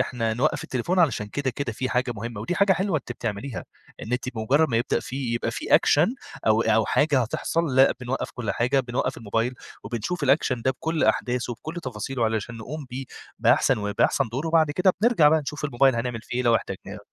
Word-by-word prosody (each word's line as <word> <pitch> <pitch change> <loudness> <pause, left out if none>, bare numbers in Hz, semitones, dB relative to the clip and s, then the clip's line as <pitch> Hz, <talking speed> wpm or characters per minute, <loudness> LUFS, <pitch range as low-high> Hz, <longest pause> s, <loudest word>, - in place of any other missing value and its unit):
إحنا 115 -4 -1
نوقَّف 135 +7 0
التليفون 165 +9 -1
علشان 130 -11 +2
كده، 135 +5 -2
كده 130 0 -4
في 130 +4 -3
حاجة 125 +1 0
مهمة، 115 0 -6
ودي 115 +11 -2
حاجة 200 +2 +4
حلوة 190 -2 0
أنتِ 120 - -7
بتعمليها، 115 +2 -5 0.4
إن 115 - -6
أنتِ 125 +1 -1
بمجرّد 135 +8 +2
ما 115 - 0
يبدأ 120 +2 +1
فيه 130 -3 -3
يبقى 120 - -1
في - - 0
أكشن 165 - +4 0.3
أو 110 +1 +4
أو 110 -1 +2
حاجة 145 -3 +3
هتحصل، 155 +5 -1
لأ 135 +1 +6
بنوقَّف 125 +1 -3
كل 115 -5 -3
حاجة، 125 +3 +1
بنوقَّف 130 +1 -2
الموبايل، 115 +3 -1 0.3
وبنشوف 120 +11 -3
الأكشن 130 -3 +2
ده 130 - +2
بكُلّ 160 +4 -1
أحداثه 120 -1 0
بكُلّ 160 +2 -6
تفاصيله 125 0 -3
علشان 110 +1 -2
نقوم 140 +7 -7
بيه 130 +2 -5 0.3
بأحسن - - +3
و 105 -1 -3
بأحسن 140 -4 +2
دور 130 +8 -3
وبعد 160 -2 +3
كده 180 +5 +3
بنرجع 220 -10 +5
بقى 155 +1 +3
نشوف 145 +1 -6
الموبايل 135 -2 +3
هنعمل 115 -1 -3
فيه 120 - -6
إيه - - +1
لو 115 -1 +5
احتجناه. 100 +1 -7
125 Hz, 205 wpm, -25 LUFS, 115-150 Hz, 0.4 s, لأ